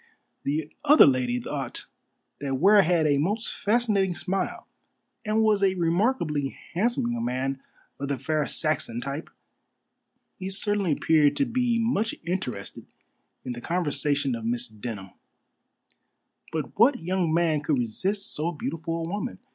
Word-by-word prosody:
The 150 +2 -2
other 300 +1 +8
lady 125 -2 +2
thought - - -5 0.5
that 140 -1 -2
Ware 200 +7 +6
had 170 -3 +2
a 145 -2 +3
most 210 +9 -1
fascinating 205 -4 +1
smile, 190 0 -2 0.6
and 215 +1 +1
was 215 -2 +3
a 190 -1 +3
remarkably 170 - 0 0.2
handsome 190 - +1
young 120 -1 -2
man 130 +2 -2 0.4
of 140 - -3
the 140 -1 -1
fair 150 +3 -1
Saxon 150 -7 -1
type. 140 +5 -5 1.1
He 190 0 -4
certainly 195 -3 0
appeared 150 0 +3
to 280 - +2
be 245 -1 +1
much 225 -1 0
interested 150 - -4 0.6
in 125 - -3
the 120 0 -6
conversation 145 -4 0
of 115 -1 -4
Miss 120 +2 -1
Denham. 105 -3 -7 1.4
But 160 +4 -4
what 250 +4 +6
young 180 -1 0
man 160 -2 +2
could 150 -2 +1
resist 190 - -1
so 160 +3 -1
beautiful 165 +1 -4
a - - -5
woman? 205 +7 -4
165 Hz, 140 wpm, -26 LUFS, 135-200 Hz, 1.4 s, other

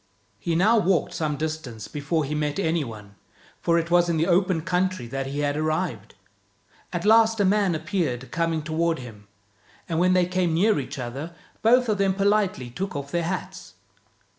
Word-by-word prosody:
He 170 -2 -1
now 215 +7 +4
walked 185 -5 +1
some 150 -2 -2
distance 155 -9 -5
before 150 +2 -1
he 145 - -4
met 150 -1 -1
any 165 -4 +1
one, 105 -5 -10 0.4
for 170 0 +2
it 170 0 -1
was 175 0 +4
in 165 - +1
the 160 - +2
open 180 -1 +2
country 185 -4 -1
that 135 +3 -4
he 140 +2 -3
had 145 0 0
arrived. 155 - -2 0.8
At 175 +1 -3
last 225 +1 +5
a 200 - +3
man 195 -2 +2
appeared 155 -6 -2
coming 165 -1 -1
toward 165 +1 0
him, 110 -6 -11 0.6
and 165 -1 -1
when 180 +1 +4
they 180 -1 +4
came 180 -2 0
near 205 +1 +3
each 135 - -6
other 135 +7 -6 0.3
both 245 +2 +4
of 210 -2 0
them 195 -1 +2
politely 195 - +1
took 190 +7 -4
off 140 0 -5
their 170 - 0
hats. 180 - -5
165 Hz, 185 wpm, -25 LUFS, 145-185 Hz, 0.8 s, last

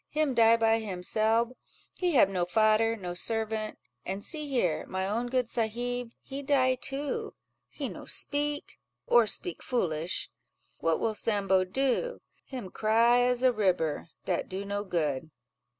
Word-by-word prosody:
him 305 -3 0
die 230 -1 +6
by 225 0 +3
himselb: 220 +5 0 0.4
he 360 -2 -1
hab 225 - +7
no 185 -2 -1
fader, 215 +4 +3
no 180 -5 -5
servant; 220 +2 -1 0.3
an 190 +2 -4
see 300 +7 -5
here, 180 - 0
my 190 0 -2
own 230 +4 -1
good 250 -1 0
sahib—he 245 +4 -3
die 265 -2 +3
too, 290 - -3 0.3
he - - -4
no - - -8
speak, 290 0 0 0.3
or 235 -2 +5
speak 175 -4 -3
foolish: 170 -8 -1 0.5
what 165 -1 +1
will 225 - 0
Sambo 195 -4 +1
do? 265 - -1 0.3
him 245 -9 -7
cry 230 +3 +4
as 250 0 +1
a 255 - +6
ribber, 180 -7 0 0.2
dat 180 - -1
do 190 +2 -4
no 200 0 -2
good." 155 -6 -1
225 Hz, 145 wpm, -29 LUFS, 190-250 Hz, 0.5 s, hab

